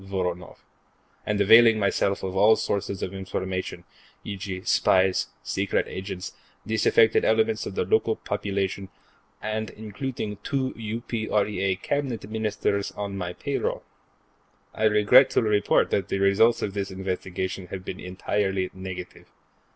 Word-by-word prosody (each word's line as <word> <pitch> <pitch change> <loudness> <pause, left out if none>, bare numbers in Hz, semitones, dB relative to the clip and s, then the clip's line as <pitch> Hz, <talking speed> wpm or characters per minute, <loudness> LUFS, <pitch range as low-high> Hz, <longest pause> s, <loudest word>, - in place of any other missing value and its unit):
Voronoff, 90 -3 -4 0.7
and 105 -1 0
availing 115 +2 +7
myself 100 -1 0
of 95 0 -3
all 105 +3 +6
sources 100 -1 -2
of 95 - -4
information, 95 -2 -4 0.4
e.g., 95 -2 -5
spies, 95 -1 +3 0.2
secret 100 +1 0
agents, 95 -1 -6 0.3
disaffected 440 - +3
elements 450 -3 +2
of - - -7
the 455 - 0
local 440 0 +2
population, 100 - -3 0.5
and 110 0 -2
including 110 0 -5
two 130 +5 -2
UPREA 110 -4 -1
Cabinet 135 -8 -2
Ministers 105 -2 -1
on 100 -1 -5
my 90 -2 -4
payroll. - - -2 0.9
I 110 - 0
regret 105 +5 +6
to - - +2
report 105 -2 +2
that 95 - 0
results 100 +4 +3
of 100 - -2
this 100 -1 -3
investigation 95 0 -4
have 95 0 -7
been 95 - -6
entirely 95 +1 -2
negative. 95 -1 -8
100 Hz, 125 wpm, -25 LUFS, 95-110 Hz, 0.9 s, availing